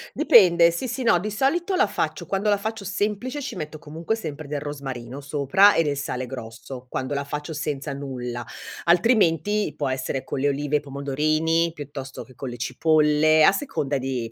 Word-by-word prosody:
Dipende, 175 - +6
sì, 170 +10 -4
sì, 255 +2 -3
no, 225 -7 +4
di 210 +5 -3
solito 320 - 0
la 380 - +4
faccio. - - -3
Quando 200 +2 -1
la 205 - +3
faccio 220 +1 -4
semplice 210 +8 -2
ci 280 - -5
metto 155 0 -6
comunque 160 +8 -3
sempre 155 -8 -7
del 145 0 -3
rosmarino 140 -2 -6
sopra 145 +8 +4
e 165 - +3
del 145 -2 -1
sale 130 -2 -3
grosso, 125 +1 -9
quando 130 +3 -3
la 140 0 -1
faccio 150 +3 -5
senza 145 -2 -3
nulla. 125 -3 -5 0.4
Altrimenti 200 0 +3
può 145 - -1
essere 130 0 -3
con - - -4
le 140 - +2
olive 145 +1 -1
e - - +6
i - - -15
pomodorini, 155 +4 0
piuttosto 140 -3 -7
che 130 - -18
con 130 +1 -6
le 120 - -7
cipolle, 155 +4 +3
a - - +8
seconda 170 - -2
di 125 -3 -3
150 Hz, 190 wpm, -24 LUFS, 135-195 Hz, 0.4 s, a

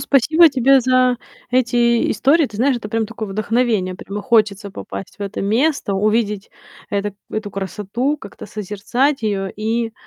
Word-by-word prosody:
спасибо 310 +5 +5
тебе 270 0 +4
за 255 0 +3 0.3
эти 240 -1 +2
истории. 300 +3 +3
Ты 210 -4 -10
знаешь, 255 +2 +2
это 210 - -6
прям 225 0 -1
такое 220 -2 -6
вдохновение. 215 -2 0
Прямо 200 +2 -7
хочется 210 -3 +2
попасть 95 - -8
в - - -27
это 200 -1 -4
место, 245 +2 +1
увидеть 210 0 0 0.4
это 205 0 -2 0.2
эту 215 -1 -4
красоту, 210 +8 -2
как-то 205 -8 -11
созерцать 215 +8 -1
её 195 -3 -1
и 225 +1 -1
225 Hz, 150 wpm, -19 LUFS, 205-255 Hz, 0.4 s, спасибо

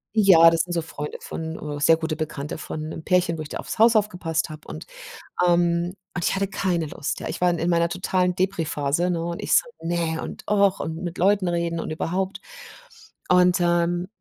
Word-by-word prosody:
ja, 185 -6 +7
das 165 -1 +1
sind 175 0 -4
so 170 - 0
Freunde 150 -2 -6
von, 160 -2 -5
äh - - -6
sehr 160 +2 +6
gute 160 -1 -3
Bekannte 150 -1 -4
von 155 0 -6
'nem 160 - -7
Pärchen, 175 -2 +1
wo - - -5
ich 150 - -10
da - - -5
aufs - - -6
Haus 230 +1 +6
aufgepasst 175 -6 0
habe 155 -1 -11
und, 75 - -8 0.6
ähm 175 +1 +2 0.2
und 175 - -2
ich - - +1
hatte 195 0 0
keine 175 -4 -1
Lust, 145 0 -4
ja. - - -5
Ich - - -5
war 180 - +4
in 170 - 0
in 170 +2 -1
meiner 170 0 +2
totalen 180 0 0
Depri-Phase, 170 -3 0
ne, 170 -2 -1
und 170 0 -4
ich - - -1
so: - - +5 0.2
„Ne, 165 -1 -1
und - - -8
ach, 200 -2 +3
und 160 - -4
mit 175 0 -5
Leuten 195 0 +3
reden 170 -1 -1
und - - -5
überhaupt.“ 190 +5 -2 0.9
Und, 180 0 +5
ähm, 175 +1 +1
170 Hz, 210 wpm, -24 LUFS, 160-180 Hz, 0.9 s, ja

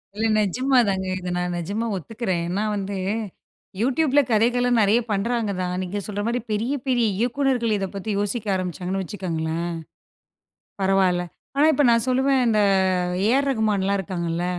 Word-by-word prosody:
இல்ல 225 +1 0
நெஜமா 255 +7 +1
தாங்க. 190 -1 -1
இத 180 0 -5
நான் 180 0 -2
நெஜமா 200 +7 -3
ஒத்துக்கிறேன். 190 -1 -3
ஏன்னா 200 +4 -1
வந்து, 195 0 -3 0.8
யூடியூபில 280 +3 +3
கதைகள்லாம் 240 +2 +3
நெறைய 210 +4 +4
பண்றாங்க 215 +1 0
தான். 180 0 -2
நீங்க 195 +3 -4
சொல்ற 205 0 -3
மாதிரி 240 0 -1
பெரிய 225 +6 0
பெரிய 240 -3 +2
இயக்குனர்கள் 245 -2 +1
இத 195 -1 -2
பத்தி 200 +3 -5
யோசிக்க 205 +2 -2
ஆரம்பிச்சாங்கன்னு 185 +1 -3
வச்சுக்கோங்களேன், 170 -3 -3 1.1
பரவாயில்ல. 190 -2 +2 0.3
ஆனா 295 - +5
இப்ப 290 - +2
நான் 230 +1 +3
சொல்லுவேன் 265 +1 +2
இந்த 215 -2 +2 0.7
ஏ 220 - +3
ஆர் 280 0 0
ரகுமான்லாம் 200 -4 +1
இருக்காங்கள்ல 170 -1 -3
210 Hz, 145 wpm, -23 LUFS, 185-240 Hz, 1.1 s, ஆனா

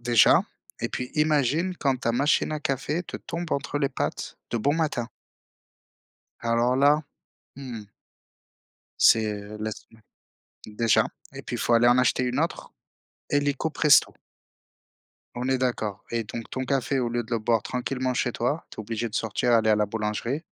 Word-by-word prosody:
déjà 120 -2 +5 0.4
et - - -1
puis 125 0 -4
imagine 155 +3 +2
quand 135 -2 +1
ta 115 - -1
machine 140 +6 +2
à 155 - -2
café 140 +5 -1
te - - -6
tombe 170 -1 -5
entre 140 +1 -1
les 140 - +1
pattes 135 - -4
de 120 - 0
bon 145 +7 +1
matin. 150 -7 -1 1.3
Alors 120 +2 +1
là! 145 +3 +4 0.5
Mmh. 125 -5 -7 1.2
C'est 105 -2 +4 0.2
laisse 110 0 -5 0.6
mmh, 105 - -16
déjà 115 0 +3 0.3
et - - -7
puis, - - -5
il - - -5
faut 120 - +1
aller 120 +1 +5
en 120 +1 +5
acheter 125 0 +2
une 125 +2 -1
autre, 165 +2 -2 0.6
illico 145 +2 0
presto. 150 -1 +5 1.3
On 125 +1 -2
est 130 -1 +2
d'accord 110 -6 -2
et 115 -1 0
donc 115 +2 -7
ton 130 - -3
café, 135 0 0
au 120 - 0
lieu 120 0 -2
de 115 - -17
le 115 - +1
boire 115 +1 +2
tranquillement 125 +2 -2
chez 125 - 0
toi, 135 +7 -2
tu - - -12
es - - -5
obligé 115 +2 -3
de 105 - -4
sortir, 115 +2 0
aller 110 -1 +4
à - - +6
la 105 0 +2
boulangerie. 110 - -3
125 Hz, 170 wpm, -26 LUFS, 115-140 Hz, 1.3 s, à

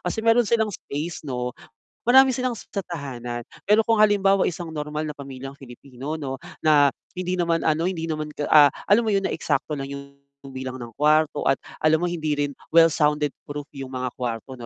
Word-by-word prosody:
Kasi 220 - -3
mayro'n 230 0 +4
silang 220 0 +2
space, 155 -1 -6
'no. 125 -2 -2 0.5
Marami 265 +2 +6
silang 250 -2 -2
sa 200 - -5
tahanan. 120 -7 -6 0.2
Pero 210 +2 +3
kung 225 -2 +3
halimbawa 195 -3 +4
isang 170 0 -6
normal 150 0 -3
na - - -5
pamilyang 135 -1 -8
Filipino, 135 +2 -8
'no, 135 -1 -4 0.2
na 145 -2 +5 0.3
hindi 185 0 -2
naman, 170 -1 +1
ano, 160 +2 +2
hindi 165 -3 -3
naman 155 -2 -3
ka 145 - -3
ah, 150 -2 +7 0.2
alam 205 +4 +6
mo - - +1
'yon, 195 -1 +1
na - - 0
eksakto 155 - -1
lang 135 -2 -4
'yong 140 0 -9 0.2
bilang 130 -1 -7
ng 120 - -7
kwarto 150 0 +2
at 135 - +5 0.2
alam 155 +1 +3
mo 175 - 0
hindi 155 -3 -1
rin 145 -1 0 0.2
well 165 0 +7
sounded 150 -1 +1 0.2
proof 145 0 -7
'yong 135 -1 -7
mga 130 0 -2
kwarto, 125 +1 -4
'no, 120 - -8
150 Hz, 195 wpm, -24 LUFS, 135-175 Hz, 0.5 s, ah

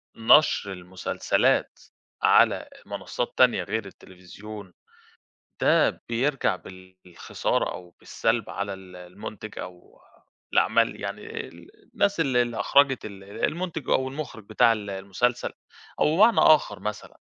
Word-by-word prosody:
نشر 115 -3 +4
المسلسلات 90 0 -1 0.4
على - - +5
أ - - -9 0.2
منصات - - -5
تانية - - +4
غير 110 -2 -3
التليفزيون، 95 +1 -12 0.9
ده - - +3
بيرجع 125 -3 0
بالخسارة 95 -2 -4
أو 90 -1 -9
بالسلب 115 -1 -1
على 100 -1 -4
ال 95 -1 -13
المُنتِج 95 +4 -9
أو 90 -1 -11 0.5
الأعمال - - +2
يعني - - -6
آآ - - -6 0.5
الناس 200 -3 +1
اللي 130 -5 +3
اللي 120 -1 -4
أخرجت 140 -2 +3
ال 100 -2 -10
ال 100 - -5
المُنتِج 165 -4 -3
أو 130 - +2
المخرج 130 -6 -7
بتاع 110 +2 +3
ال 105 -2 -4
المسلسل؟ 100 +6 -1 0.5
أو 155 +2 +3
بمعنى 220 +3 +5
آخر 145 -9 +4
مثلًا، 105 0 -6
105 Hz, 125 wpm, -25 LUFS, 95-130 Hz, 0.9 s, على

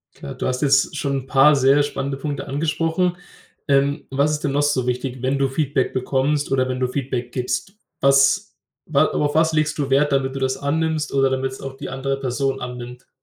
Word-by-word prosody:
Klar, 70 - -8
du - - -4
hast 125 +1 -2
jetzt 140 +1 +3
schon 140 -1 -1
'n - - -17
paar 135 +3 +5
sehr 135 +1 +4
spannende 140 -1 -3
Punkte 140 0 -4
angesprochen. 165 +4 0 0.5
Ähm, 140 +2 +2
was 140 +3 +1
ist 150 - -2
denn 140 - 0
noch 145 +1 +1
so 145 -4 +1
wichtig, 125 0 -3
wenn 135 +2 0
du 135 0 +2
Feedback 135 -1 -1
bekommst 135 +3 0
oder 130 -1 +1
wenn 130 0 -3
du 125 - +1
Feedback 125 -2 -3
gibst? 125 +8 -3 0.3
Was 140 +9 +3 0.3
wa 145 -3 +3
auf 145 0 -1
was 160 +1 +3
legst 155 0 +1
du 140 -2 -2
Wert, 140 +2 +3
damit 135 -1 0
du 135 - -4
das 130 0 0
annimmst 155 +2 -1
oder 135 -1 +3
damit's 130 0 -2
auch 135 -1 -7
die - - -7
andere 135 +1 -2
Person 135 +1 -2
annimmt? 125 0 -8
135 Hz, 205 wpm, -21 LUFS, 130-145 Hz, 0.5 s, paar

